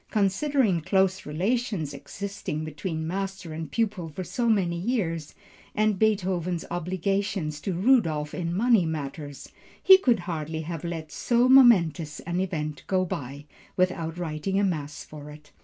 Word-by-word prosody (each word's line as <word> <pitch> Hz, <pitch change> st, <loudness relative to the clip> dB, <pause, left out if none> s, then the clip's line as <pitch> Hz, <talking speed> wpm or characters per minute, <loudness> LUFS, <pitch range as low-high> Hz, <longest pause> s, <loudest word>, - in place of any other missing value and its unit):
Considering 215 Hz, -, +2 dB
the -, -, -4 dB
close 190 Hz, +1 st, +1 dB
relations 185 Hz, -, -1 dB
existing 170 Hz, 0 st, -5 dB
between 160 Hz, +1 st, -4 dB
master 190 Hz, -1 st, -4 dB
and 160 Hz, 0 st, -6 dB
pupil 210 Hz, -7 st, -1 dB
for 170 Hz, +5 st, -6 dB
so 230 Hz, +7 st, -1 dB
many 185 Hz, -6 st, +2 dB
years, 170 Hz, -, -2 dB, 0.4 s
and 215 Hz, -2 st, +2 dB
Beethoven's 185 Hz, -5 st, 0 dB
obligations 180 Hz, -2 st, -2 dB
to 190 Hz, -, -2 dB
Rudolph 170 Hz, -, +2 dB
in 170 Hz, -2 st, -3 dB
money 220 Hz, +2 st, +3 dB
matters, 145 Hz, -2 st, -6 dB, 0.3 s
he 380 Hz, 0 st, +8 dB
could 240 Hz, -, +2 dB
hardly 160 Hz, -2 st, -4 dB
have 165 Hz, 0 st, -6 dB
let 165 Hz, -2 st, -5 dB
so 240 Hz, +1 st, +2 dB
momentous 180 Hz, -, +5 dB
an 175 Hz, +1 st, -3 dB
event 155 Hz, -5 st, -3 dB
go 185 Hz, -1 st, +1 dB
by, 140 Hz, -3 st, -6 dB, 0.3 s
without 175 Hz, -3 st, 0 dB
writing 175 Hz, +3 st, -2 dB
a -, -, +2 dB
mass 150 Hz, -6 st, -2 dB
for 150 Hz, -1 st, -10 dB
it. 150 Hz, 0 st, -14 dB
175 Hz, 145 wpm, -26 LUFS, 155-200 Hz, 0.4 s, he